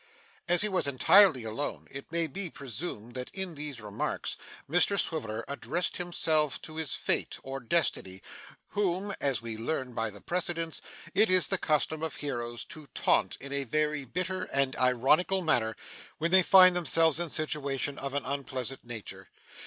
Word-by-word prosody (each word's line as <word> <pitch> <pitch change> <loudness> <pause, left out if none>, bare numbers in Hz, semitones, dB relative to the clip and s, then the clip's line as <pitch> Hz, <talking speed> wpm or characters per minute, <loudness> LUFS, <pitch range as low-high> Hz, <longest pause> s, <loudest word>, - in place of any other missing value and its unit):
As 175 +3 +5
he - - +2
was 190 -7 +1
entirely 140 - +5
alone, 115 +6 -4
it 135 +3 -9
may 170 0 +1
be 180 +4 -4
presumed 120 -4 -6
that, 125 -1 -5
in 190 -3 -4
these 145 -4 -6
remarks, 105 -2 -3 0.3
Mr 180 +5 +4
Swiveller 115 -9 -2
addressed 160 +5 -2
himself 155 -4 0
to 155 0 -9
his 160 -3 -1
fate - - +1
or 135 0 -5
destiny, 115 - -1 0.5
whom, 200 0 -1
as 135 -4 0
we 115 -1 -5
learn 125 +1 -3
by 115 -1 -2
the 100 -1 -10
precedents, 165 - -2 0.3
it 210 +2 +4
is 185 -1 +5
the 195 - +2
custom 155 0 +1
of 160 -1 -3
heroes 120 -5 -4
to 155 -2 -11
taunt - - +2
in 140 +1 -8
a 140 0 -1
very 150 +2 -1
bitter 185 +7 -3
and 135 -1 0
ironical 140 +10 +2
manner 110 -9 +2 0.4
when 165 +2 -1
they 190 0 +7
find 185 0 +8
themselves 165 -2 +3
in 175 -1 -3
situations 145 -2 -1
of 140 0 -5
an 145 - -2
unpleasant 135 -1 -3
nature. 105 -5 -9
150 Hz, 165 wpm, -29 LUFS, 130-175 Hz, 0.5 s, find